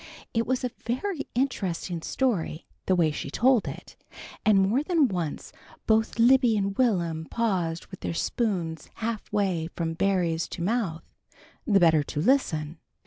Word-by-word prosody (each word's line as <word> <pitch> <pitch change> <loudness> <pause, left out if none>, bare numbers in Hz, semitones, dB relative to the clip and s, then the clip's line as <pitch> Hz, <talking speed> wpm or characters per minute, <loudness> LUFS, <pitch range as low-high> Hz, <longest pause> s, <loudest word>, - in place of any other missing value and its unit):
It 230 -1 0
was 255 0 0
a 250 - -1
very 285 - -2
interesting 190 -9 -1
story, 185 - -1 0.2
the 185 - +4
way 165 -3 +3
she 145 - -5
told 245 - +3
it, - - -8 0.5
and 215 -2 +5
more 195 +8 +3
than 310 -2 +3
once 175 -8 -4 0.3
both 220 +1 +2
Libby 240 -1 +5
and 195 -1 -1
Will'm 170 -10 +1
paused 180 -7 -1
with 190 - -9
their - - -4
spoons 175 -6 -2
half 225 -1 -4
way 185 -6 0
from 165 -1 -2
berries 170 -2 0
to 170 - -5
mouth, 190 -6 -1 0.6
the 200 -3 +5
better 160 -3 +5
to 145 +1 -5
listen. 160 - +1
195 Hz, 150 wpm, -26 LUFS, 165-235 Hz, 0.6 s, and